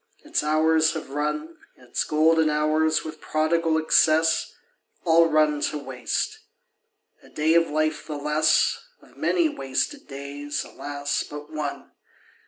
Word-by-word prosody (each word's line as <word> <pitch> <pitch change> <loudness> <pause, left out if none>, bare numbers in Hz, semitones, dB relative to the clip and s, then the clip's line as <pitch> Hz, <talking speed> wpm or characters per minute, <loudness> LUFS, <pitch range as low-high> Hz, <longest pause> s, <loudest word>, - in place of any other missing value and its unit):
Its 305 +1 -1
hours 160 +1 +3
have 155 -4 -7
run, 150 +3 -3 0.2
Its 125 -1 -3
golden 160 +1 +3
hours, 155 +1 +1
with 155 - -8
prodigal 160 +1 +1
excess, 160 0 +3 0.5
All 165 0 +5
run 150 -1 +2
to 150 - -4
waste. 140 - -3 0.8
A - - -18
day 155 +2 +1
of 165 0 +3
life 155 +1 -1
the 150 -2 -4
less; 150 +2 +2 0.2
Of - - -21
many 345 -3 +1
wasted 275 - -3
days, 140 +1 -5
alas, 145 0 -3
but 150 +1 -9
one! 150 -2 -5
155 Hz, 130 wpm, -24 LUFS, 150-160 Hz, 0.8 s, All